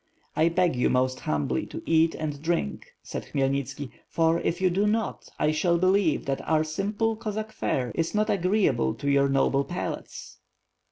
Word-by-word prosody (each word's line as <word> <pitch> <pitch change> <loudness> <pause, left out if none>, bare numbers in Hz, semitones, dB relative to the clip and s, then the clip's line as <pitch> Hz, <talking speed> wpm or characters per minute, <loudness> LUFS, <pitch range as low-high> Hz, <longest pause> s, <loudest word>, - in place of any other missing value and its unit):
"I 160 +2 +4
beg 175 -3 +2
you 125 - +2
most 130 0 +1
humbly 75 -4 -1
to - - -7
eat 165 0 +3
and 150 -2 -4
drink," 160 - -2 0.2
said - - -6
Khmyel 135 -1 0
nitski, 135 0 -4 0.2
"for, 165 0 +2
if 170 +1 -1
you 185 -1 +2
do 200 +4 +2
not, 220 +1 -1
I 150 - +2
shall 170 +2 +2
believe 185 -2 +2
that 135 -1 -1
our 155 -1 +3
simple 205 +8 -1
Cossack 215 0 -4
fare 125 - -1
is 165 +4 -1
not 215 0 +2
agreeable 185 - +2
to 140 - -5
your 140 0 +3
noble 135 0 +2
palates.' 175 +6 -6
160 Hz, 175 wpm, -26 LUFS, 140-190 Hz, 0.2 s, I